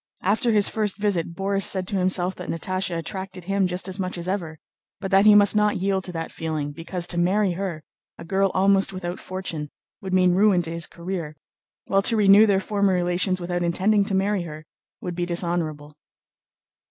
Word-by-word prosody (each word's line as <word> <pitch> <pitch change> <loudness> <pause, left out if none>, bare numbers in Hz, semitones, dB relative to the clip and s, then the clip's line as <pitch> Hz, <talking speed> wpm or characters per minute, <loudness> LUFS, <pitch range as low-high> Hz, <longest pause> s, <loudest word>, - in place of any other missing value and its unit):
After 220 +5 +1
his 210 -2 +4
first 210 -3 -1
visit 185 -5 -1
Borís 195 +1 -1
said 185 -1 +2
to 205 - -2
himself 185 0 0
that 180 - -7
Natásha 185 +1 -2
attracted 190 +2 -6
him 195 +1 +1
just 180 +1 -3
as 190 +1 -5
much 185 -1 -3
as 170 +1 -5
ever, 175 -5 -3 0.4
but 195 0 -5
that 195 +1 +5
he 210 - +8
must 205 0 +6
not 210 0 +2
yield 190 0 0
to 180 - -5
that 165 -1 -5
feeling, 155 -3 -4
because 170 +3 -3
to 175 -1 0
marry 190 +3 +2
her, 175 -3 -4 0.3
a - - -10
girl 195 +3 +1
almost 195 +1 +3
without 180 -1 -5
fortune, 175 -5 -5 0.3
would 190 - -6
mean 180 -1 +4
ruin 190 -2 +3
to 165 - -4
his 170 0 -1
career, 170 -3 -6 0.5
while 195 - +2
to 225 +3 +2
renew 205 +1 +6
their 195 -2 +3
former 200 -1 0
relations 180 +1 0
without 175 0 -3
intending 195 +5 +2
to 200 -2 -1
marry 195 0 +1
her 155 -2 -8 0.4
would 180 - -4
be 175 0 -3
dishonorable. 165 -4 -3
185 Hz, 195 wpm, -23 LUFS, 175-195 Hz, 0.5 s, he